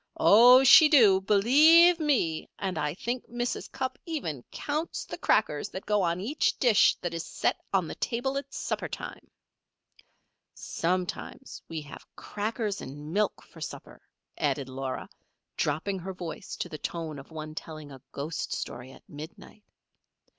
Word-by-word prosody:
Oh, 245 +5 +7
she 305 +4 +9
do 215 -11 +6
believe 305 - +6
me! 250 - 0
And 190 -2 -3
I 150 +1 -2
think 240 +5 -4
Mrs. 240 +1 -3
Cupp 260 0 -4
even 165 - -4
counts 305 +3 -4
the - - -6
crackers 150 -9 +1
that 190 - -8
go 210 -1 +2
on 170 -1 0
each 250 +11 0
dish 235 -5 +4
that 175 -1 -3
is 165 -1 -3
set - - -1
on 185 -4 +1
the - - -5
table 255 +3 -2
at 275 0 -4
supper - - -3
time. - - -8 1.3
"Sometimes 180 +9 -4
we 160 -1 -4
have 145 -2 -11
crackers 210 0 -3
and 145 +4 -8
milk 210 0 0
for - - -16
supper," - - -8 0.4
added 135 -2 -1
Laura, 130 0 -5 0.5
dropping 165 +7 -1
her 190 +2 -6
voice 175 -3 -7
to - - -4
the 155 - -8
tone 160 -4 -5
of 135 - -13
one 155 -1 -7
telling 155 -2 -8
a 135 -2 -12
ghost 145 +3 -4
story 125 +2 -6
at - - -17
midnight. 160 +7 -11
190 Hz, 155 wpm, -28 LUFS, 155-245 Hz, 1.3 s, she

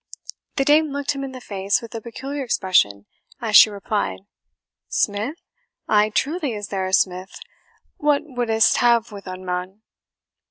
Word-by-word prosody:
The 275 - +1
dame 305 +2 +5
looked 285 0 -2
him 275 -1 -4
in 270 - -5
the 260 - -8
face 200 -3 -1
with 230 - -11
a 225 - -5
peculiar 270 +5 -6
expression 175 - +1 0.3
as 225 -4 -1
she 215 - +10
replied, 205 -1 -3 0.7
"Smith! 215 +9 -1 0.5
ay, 210 0 +3
truly 290 +4 -1
is 205 -2 -6
there 190 -2 -2
a - - -4
smith 185 0 0 0.6
what 295 -1 +2
wouldst 240 -5 +2
ha' 240 -1 +5
wi' 200 -1 -8
un, 185 0 -7
mon?" 185 +3 -4
220 Hz, 155 wpm, -22 LUFS, 195-270 Hz, 0.7 s, she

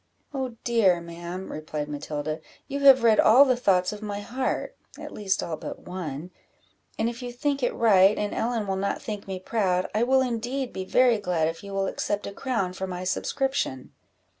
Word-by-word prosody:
"Oh 260 -4 -3
dear, 215 -7 +3
ma'am," 170 +2 -7
replied 155 -1 -4
Matilda, 150 +1 -4 0.3
"you 280 0 -3
have 270 -3 +7
read 225 -2 +5
all 260 +6 +8
the 255 -2 +3
thoughts 190 -5 +2
of 210 - -9
my 205 -1 -4
heart, 250 +5 -3 0.2
(at - - -8
least 195 -2 -1
all 165 - -3
but - - -7
one,) 175 -2 -6 0.7
and 220 - +1
if 235 +1 -5
you 245 -1 -5
think 280 +3 -1
it 245 - 0
right, 200 -3 +5
and 210 0 -2
Ellen 230 -2 -1
will 195 -1 -1
not 200 +1 -1
think 210 -3 -6
me 190 -1 -4
proud, 185 -3 0
I 215 - +1
will 260 +2 +4
indeed 250 +1 -2
be 190 - -4
very 245 +2 +4
glad 175 -5 0
if 165 +4 -8
you 200 - -8
will 195 0 0
accept 205 +1 -2
a - - -5
crown 200 -7 -2
for 190 +1 -4
my 180 0 -5
subscription." 225 - -1
205 Hz, 195 wpm, -26 LUFS, 180-240 Hz, 0.7 s, all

